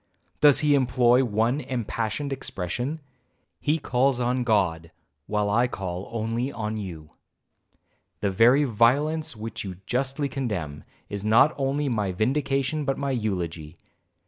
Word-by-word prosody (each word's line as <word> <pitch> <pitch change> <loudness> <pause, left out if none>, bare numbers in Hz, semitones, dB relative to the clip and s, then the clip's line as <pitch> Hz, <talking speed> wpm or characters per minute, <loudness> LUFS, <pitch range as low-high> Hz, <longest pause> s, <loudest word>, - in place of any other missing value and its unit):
does 145 -2 +6
he 150 -1 +3
employ 125 -1 +4
one 115 +3 +1
impassioned 125 +3 -3
expression? 125 - -4 0.6
he 150 +2 +1
calls 130 -2 +1
on 125 +1 0
God,—while 90 - -1
I 120 +4 +3
call 95 -5 -5
only 115 +3 -2
on 110 -3 -4
you. 85 -7 -7 1.1
The 100 - +1
very 120 +8 +5
violence 140 +6 +2
which 110 +1 -6
you 95 -3 -6
justly 135 +4 -1
condemn, 100 - -4 0.2
is 100 -1 -5
not 115 +8 +5
only 140 +1 -1
my 105 -6 0
vindication 135 - 0
but 135 -1 -1
my 140 -1 -2
eulogy. 85 - -3
120 Hz, 125 wpm, -25 LUFS, 100-135 Hz, 1.1 s, does